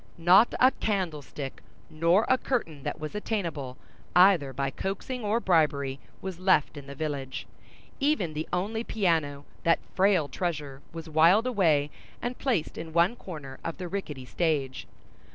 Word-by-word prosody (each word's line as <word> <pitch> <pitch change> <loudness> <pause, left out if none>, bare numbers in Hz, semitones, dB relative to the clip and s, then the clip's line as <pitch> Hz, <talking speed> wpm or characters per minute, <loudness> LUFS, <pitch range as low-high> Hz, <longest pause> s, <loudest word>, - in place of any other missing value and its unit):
Not 180 +7 +5
a 255 +1 +6
candlestick 155 - -3 0.3
nor 170 +6 +2
a 260 - +5
curtain 165 - -2
that - - -4
was 155 0 -5
attainable, 170 - -3 0.4
either 180 -7 +6
by 135 +1 -2
coaxing 210 - -4
or 210 +2 +1
bribery, 145 - +1 0.2
was 190 -2 -5
left 185 -5 +3
in 140 -1 -9
the 140 - -8
village; 140 -3 -4 0.5
even 275 - +1
the 155 +1 -4
only 210 +6 -1
piano, 160 -10 0 0.2
that 165 - +4 0.2
frail 190 -5 +3
treasure, 150 -6 -4
was 165 0 -8
wiled 165 +8 +5
away 165 - +2 0.3
and 245 +1 -4
placed 235 - -1
in 160 0 -7
one 170 +7 +3
corner 150 - -9
of 165 - -4
the 180 -1 -5
rickety 155 -9 -5
stage. 140 -4 -1
165 Hz, 150 wpm, -28 LUFS, 145-195 Hz, 0.5 s, a